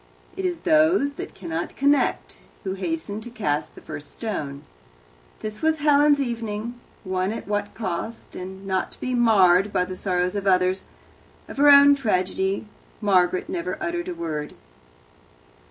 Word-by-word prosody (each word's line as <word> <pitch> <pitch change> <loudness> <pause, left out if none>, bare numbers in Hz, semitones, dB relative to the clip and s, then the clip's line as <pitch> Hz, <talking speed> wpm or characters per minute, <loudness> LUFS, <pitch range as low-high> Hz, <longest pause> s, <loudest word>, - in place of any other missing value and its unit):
It 380 0 -3
is 355 -2 -2
those 310 -2 +3
that - - -8
cannot 170 -2 -4
connect 285 +1 +1 0.2
who 190 -2 -2
hasten 215 - -4
to 240 - -8
cast 155 -11 -2
the - - -12
first 150 -1 -8
stone. 145 -11 -5 0.8
This 215 0 -6
was 320 0 +2
Helen's 290 -1 +4
evening 235 -2 -3 0.3
won 185 +1 -1
at 225 - -6
what 205 0 -2
cost, 220 +2 -5
and 190 +1 -8
not 190 -1 -1
to - - -14
be 255 - -2
marred 205 -5 +4
by 180 - +1
the 185 - -6
sorrows 180 0 -1
of 200 -1 -2
others. 185 0 +2 0.6
Of - - -10
her 290 +1 +6
own 285 0 +9
tragedy 190 -5 0 0.3
Margaret 185 -2 +2
never 345 -1 -3
uttered 345 +1 -3
a 360 - -4
word. 150 - -4
210 Hz, 155 wpm, -24 LUFS, 185-280 Hz, 0.8 s, own